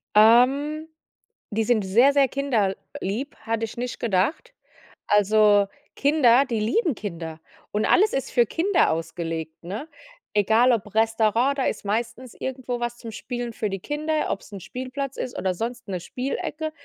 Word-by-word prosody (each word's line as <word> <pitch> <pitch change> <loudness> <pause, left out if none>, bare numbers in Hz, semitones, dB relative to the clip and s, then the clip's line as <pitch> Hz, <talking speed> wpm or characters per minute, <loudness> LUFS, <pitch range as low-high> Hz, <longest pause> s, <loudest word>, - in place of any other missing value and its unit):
Ähm, 270 +8 +5 0.6
die 220 +2 +1
sind 220 -2 +2
sehr, 240 +9 +5
sehr 280 -1 +4
kinderlieb, 230 -1 -2
hatte 225 0 -1
ich 220 - -10
nicht 245 +1 -4
gedacht. 230 - 0 0.5
Also, 210 0 +4 0.3
Kinder 275 -3 +4
die 235 -4 -2
lieben 295 - +1
Kinder 165 -6 -6 0.3
und 210 +1 0
alles 415 +3 +4
ist 270 - -2
für 240 - +4
Kinder 355 - +2
ausgelegt, 165 -1 -4
ne? 205 - -5 0.5
Egal 220 +5 +4
ob 210 -3 -3
Restaurant, 225 +4 +2
da 270 - 0
ist - - -2
meistens 230 +4 -3
irgendwo 255 -2 -4
was 240 0 -3
zum 230 - -8
Spielen 240 +1 -5
für 215 -1 -2
die 195 - -3
Kinder, 305 - -1
ob's 200 - -5
'n 200 - -6
Spielplatz 260 +6 -5
ist 245 - -4
oder 185 -1 -1
sonst 235 +3 -5
'ne 185 -2 -3
Spielecke. 285 - -4
235 Hz, 155 wpm, -24 LUFS, 205-270 Hz, 0.6 s, Ähm